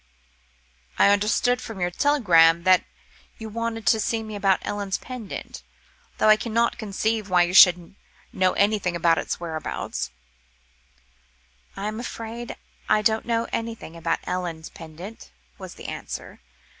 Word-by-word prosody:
"I -, -, +6 dB
understood 215 Hz, +5 st, +2 dB
from 225 Hz, -4 st, -8 dB
your 175 Hz, 0 st, 0 dB
telegram 170 Hz, -, +4 dB
that 185 Hz, 0 st, +4 dB, 0.5 s
you 220 Hz, -1 st, -7 dB
wanted 230 Hz, 0 st, -4 dB
to 220 Hz, -, +4 dB
see 225 Hz, +1 st, -1 dB
me 215 Hz, -1 st, -7 dB
about 195 Hz, -2 st, +2 dB
Ellen's 200 Hz, -2 st, -2 dB
pendant, 250 Hz, -5 st, -8 dB, 0.6 s
though -, -, +2 dB
I 215 Hz, 0 st, +7 dB
cannot 230 Hz, +1 st, 0 dB
conceive 215 Hz, 0 st, -2 dB
why 180 Hz, -1 st, +5 dB
you 175 Hz, +1 st, -2 dB
should 180 Hz, -1 st, +6 dB, 0.4 s
know 185 Hz, -1 st, +2 dB
anything 200 Hz, -3 st, +1 dB
about 170 Hz, -1 st, +3 dB
its -, -, -4 dB
whereabouts." 160 Hz, -2 st, -4 dB, 1.7 s
"I 195 Hz, -, -4 dB
am 215 Hz, +1 st, -4 dB
afraid 235 Hz, 0 st, -6 dB, 0.3 s
I 210 Hz, -, +3 dB
don't 220 Hz, +1 st, +1 dB
know 230 Hz, 0 st, +1 dB
anything 225 Hz, -7 st, -5 dB
about 165 Hz, 0 st, -1 dB
Ellen's 170 Hz, -3 st, -4 dB
pendant," 170 Hz, +7 st, -11 dB, 0.3 s
was -, -, -9 dB
the -, -, -12 dB
answer. -, -, -7 dB
205 Hz, 140 wpm, -24 LUFS, 180-225 Hz, 1.7 s, I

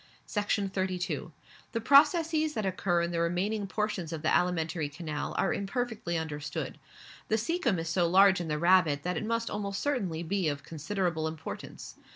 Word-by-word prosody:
Section 205 Hz, -1 st, 0 dB
32. 185 Hz, -2 st, -2 dB, 0.4 s
The 230 Hz, -, 0 dB
processes 310 Hz, +4 st, +4 dB
that 215 Hz, -, -1 dB
occur 175 Hz, -2 st, +1 dB
in 170 Hz, -, -2 dB
the 170 Hz, -, -1 dB
remaining 195 Hz, +5 st, 0 dB
portions 195 Hz, -5 st, -2 dB
of 160 Hz, -1 st, -5 dB
the 155 Hz, -, +3 dB
alimentary 165 Hz, -3 st, 0 dB
canal 150 Hz, -1 st, -5 dB
are -, -, +2 dB
imperfectly 205 Hz, -4 st, -2 dB
understood. 150 Hz, -2 st, -4 dB, 0.5 s
The 220 Hz, -, +2 dB
caecum 240 Hz, -, 0 dB
is 165 Hz, 0 st, -3 dB
so 170 Hz, 0 st, +2 dB
large 190 Hz, +1 st, +6 dB
in 170 Hz, -, -4 dB
the 150 Hz, -1 st, -1 dB
rabbit 170 Hz, -4 st, +4 dB
that 180 Hz, 0 st, -1 dB
it -, -, -2 dB
must 230 Hz, +1 st, -1 dB
almost 200 Hz, -1 st, -3 dB
certainly 195 Hz, -, -1 dB
be 185 Hz, +1 st, 0 dB
of 140 Hz, -1 st, -4 dB
considerable 165 Hz, +1 st, -2 dB
importance. 160 Hz, 0 st, -7 dB
180 Hz, 170 wpm, -30 LUFS, 165-210 Hz, 0.5 s, large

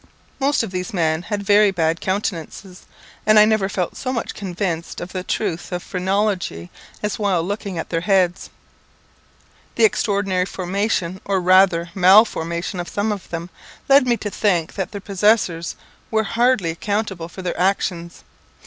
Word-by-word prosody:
Most 280 Hz, -1 st, +2 dB
of 220 Hz, -, -5 dB
these 185 Hz, +1 st, -4 dB
men 160 Hz, -2 st, +1 dB
had 205 Hz, +2 st, -4 dB
very 205 Hz, +1 st, +5 dB
bad 165 Hz, -3 st, 0 dB
countenances, 185 Hz, -1 st, -4 dB, 0.4 s
and 215 Hz, 0 st, +4 dB
I 210 Hz, -, +8 dB
never 215 Hz, -3 st, +1 dB
felt 180 Hz, -3 st, -2 dB
so 255 Hz, -, -3 dB
much 235 Hz, -3 st, -3 dB
convinced 180 Hz, -3 st, -4 dB
of 175 Hz, +1 st, -7 dB
the 185 Hz, -, -2 dB
truth 185 Hz, -3 st, -3 dB
of 180 Hz, -1 st, -3 dB
phrenology 185 Hz, -, -2 dB, 0.3 s
as 210 Hz, +1 st, -2 dB
while 195 Hz, -5 st, +1 dB
looking 200 Hz, 0 st, -4 dB
at 165 Hz, -, -4 dB
their 165 Hz, -1 st, -1 dB
heads. 185 Hz, -2 st, +1 dB, 1.3 s
The -, -, +2 dB
extraordinary 200 Hz, -, +1 dB
formation, 190 Hz, -1 st, -2 dB
or 195 Hz, -1 st, 0 dB
rather 180 Hz, -2 st, +4 dB
mal 190 Hz, +4 st, +7 dB
formation, 170 Hz, +1 st, -4 dB
of 175 Hz, -, -4 dB
some 205 Hz, +2 st, -1 dB
of 200 Hz, -3 st, -6 dB
them, 170 Hz, +1 st, -5 dB, 0.4 s
led 275 Hz, -1 st, +5 dB
me 240 Hz, -1 st, +2 dB
to 205 Hz, -1 st, -5 dB
think 180 Hz, -7 st, 0 dB
that 190 Hz, -3 st, -4 dB
their 200 Hz, -, -6 dB
possessors 195 Hz, -4 st, +1 dB, 0.3 s
were 220 Hz, 0 st, +1 dB
hardly 230 Hz, -5 st, +1 dB
accountable 190 Hz, -1 st, -3 dB
for 190 Hz, -, -9 dB
their 180 Hz, -, -3 dB
actions. 180 Hz, -2 st, -1 dB
190 Hz, 160 wpm, -21 LUFS, 175-210 Hz, 1.3 s, I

